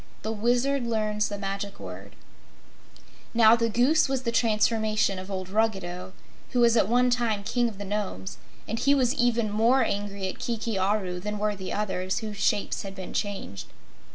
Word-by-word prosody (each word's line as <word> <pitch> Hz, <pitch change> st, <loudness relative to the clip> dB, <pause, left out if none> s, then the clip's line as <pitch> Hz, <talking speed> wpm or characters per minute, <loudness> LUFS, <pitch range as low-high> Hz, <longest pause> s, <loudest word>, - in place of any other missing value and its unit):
The 220 Hz, -, -2 dB
Wizard 245 Hz, +4 st, +1 dB
Learns 215 Hz, -2 st, 0 dB
the 205 Hz, -, -4 dB
Magic 200 Hz, 0 st, -4 dB
Word 95 Hz, +1 st, -9 dB, 1.2 s
Now, 225 Hz, -1 st, +7 dB
the 230 Hz, -1 st, 0 dB
Goose 265 Hz, +7 st, +3 dB
was 265 Hz, -1 st, -1 dB
the 235 Hz, -, 0 dB
transformation 215 Hz, -3 st, +2 dB
of 185 Hz, +1 st, -8 dB
old 185 Hz, -2 st, -4 dB
Ruggedo, 190 Hz, -4 st, -1 dB, 0.4 s
who 250 Hz, -, +2 dB
was 235 Hz, -1 st, +5 dB
at 210 Hz, -, +4 dB
one 250 Hz, +1 st, +3 dB
time 230 Hz, -4 st, 0 dB
King 240 Hz, +3 st, +1 dB
of 210 Hz, -, -11 dB
the 205 Hz, -, -6 dB
Nomes, 190 Hz, -, -4 dB, 0.3 s
and 225 Hz, +2 st, -2 dB
he 280 Hz, +3 st, +4 dB
was 255 Hz, -3 st, +2 dB
even 235 Hz, -3 st, +1 dB
more 230 Hz, +5 st, +4 dB
angry 200 Hz, -2 st, -2 dB
at 185 Hz, -, -6 dB
Kiki 230 Hz, -2 st, -2 dB
Aru 190 Hz, -2 st, 0 dB
than 210 Hz, +3 st, -4 dB
were 210 Hz, 0 st, 0 dB
the 190 Hz, -1 st, -6 dB
others 190 Hz, -3 st, -2 dB
who 215 Hz, -1 st, -4 dB
shapes 205 Hz, 0 st, 0 dB
had 195 Hz, -1 st, -7 dB
been 190 Hz, -1 st, -7 dB
changed. 195 Hz, -, -4 dB
210 Hz, 180 wpm, -27 LUFS, 195-235 Hz, 1.2 s, Now